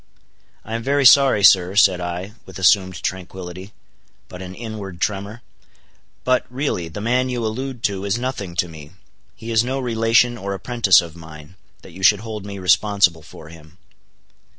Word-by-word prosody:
"I 110 - -7
am 115 - -2
very 140 +3 0
sorry, 130 -5 +6
sir," 95 -1 +5
said 95 -3 +4
I, 90 +3 -5 0.2
with 95 - -10
assumed 95 0 +2
tranquility, 95 +1 -6 0.6
but 90 - -10
an 95 0 -8
inward 105 -5 -8
tremor, 105 +4 -3 0.8
"but, 130 0 +2
really, 125 - -3
the 80 +5 -8
man 125 +3 0
you 120 -2 -3
allude 125 +2 -5
to 100 -1 -1
is 100 +3 0
nothing 120 -8 -5
to 90 0 0
me—he 85 +8 -13
is 110 0 +3
no 130 +2 -3
relation 115 0 +1
or 100 0 -4
apprentice 115 -3 +3
of 85 -2 -10
mine, 80 -1 -13 0.3
that - - -13
you 95 - -11
should 100 +1 +4
hold 110 -3 -7
me 100 -1 -7
responsible 95 -2 +2
for 80 0 -14
him." 80 +1 -16
100 Hz, 165 wpm, -20 LUFS, 90-115 Hz, 0.8 s, sorry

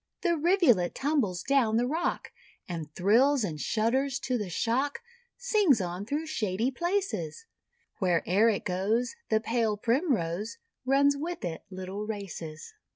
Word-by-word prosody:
The 345 -2 +2
Rivulet 315 - +3
tumbles 265 - 0
down 250 -5 +2
the 240 - +2
rock, 315 +7 -2 0.4
And 165 -4 -5
thrills 245 +8 +4
and 155 -7 -3
shudders 260 +5 +1
to 255 - -1
the 210 -5 -2
shock9 245 - 0 0.4
Sings 420 - +3
on 180 +2 -4
through 295 +5 -2
shady 225 -5 -1
places; 345 - -2 0.5
Where'er 185 +3 +3
it 210 - -1
goes, 205 +7 0 0.2
The 220 - +3
Pale 225 -2 0
Primrose 225 - 0 0.3
Runs 280 +1 +4
with 325 - -4
it 160 -2 -5
little 190 +2 -6
races. 175 -7 -6
230 Hz, 135 wpm, -29 LUFS, 185-280 Hz, 0.5 s, thrills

